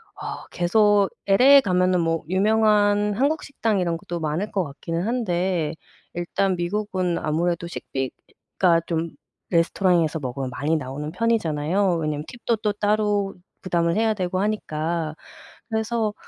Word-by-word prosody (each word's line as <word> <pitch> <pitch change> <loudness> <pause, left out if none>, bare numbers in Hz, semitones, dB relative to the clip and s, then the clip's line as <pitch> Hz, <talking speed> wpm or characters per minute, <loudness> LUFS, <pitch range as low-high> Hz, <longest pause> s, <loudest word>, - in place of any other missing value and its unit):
어 - - -7
계속 205 +3 +3 0.2
LA에 265 +8 +7
가면은 185 -3 +2
뭐 165 0 0
유명한 210 +1 +3
한국 285 +6 +1
식당 225 -7 -1
이런 170 -2 0
것도 170 +1 -6
많을 160 +7 -2
것 190 -3 0
같기는 165 +3 -4
한데 180 -8 0 0.4
일단 180 +2 0
미국은 185 -1 -1
아무래도 170 +2 -1
식비가 165 +4 -2
좀 165 -1 -2 0.4
레스토랑에서 170 -2 +2
먹으면 130 0 -4
많이 145 +5 -1
나오는 145 +2 -5
편이잖아요? 180 -3 +1
왜냐면 150 -1 -2
팁도 235 -2 -2
또 210 -1 0
따로 205 -1 +1 0.3
부담을 170 -2 0
해야 220 0 +2
되고 185 -2 -2
하니까. 165 -6 -2 0.5
그래서 220 -1 -1
180 Hz, 300 characters per minute, -23 LUFS, 165-210 Hz, 0.5 s, LA에